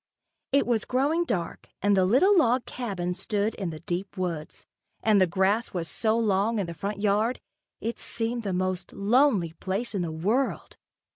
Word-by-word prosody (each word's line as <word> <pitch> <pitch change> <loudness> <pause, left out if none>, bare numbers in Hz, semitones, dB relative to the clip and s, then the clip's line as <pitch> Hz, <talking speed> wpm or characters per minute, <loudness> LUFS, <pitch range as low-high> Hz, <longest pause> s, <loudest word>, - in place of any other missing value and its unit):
It 280 +1 +3
was 235 -3 +1
growing 290 +7 +1
dark 175 - -3
and 205 0 +3
the 190 -1 +4
little 310 - +5
log 250 -7 +3
cabin 190 -8 -3
stood 205 +3 -1
in 195 -4 -4
the 155 -1 -8
deep 180 +4 -4
woods, 170 -4 -4 0.4
and 210 -3 +4
the 185 - +5
grass 195 +6 +1
was 170 -2 -2
so 220 +4 0
long 215 0 +1
in 200 - 0
the 170 - -6
front 200 +4 -4
yard, 215 +4 +2 0.4
it 230 +1 -3
seemed 235 +1 -2
the 200 -3 -3
most 185 0 -2
lonely 210 - +3
place 195 +7 -3
in 195 - -1
the 170 -2 -2
world. 210 +12 -1
205 Hz, 175 wpm, -27 LUFS, 185-235 Hz, 0.4 s, little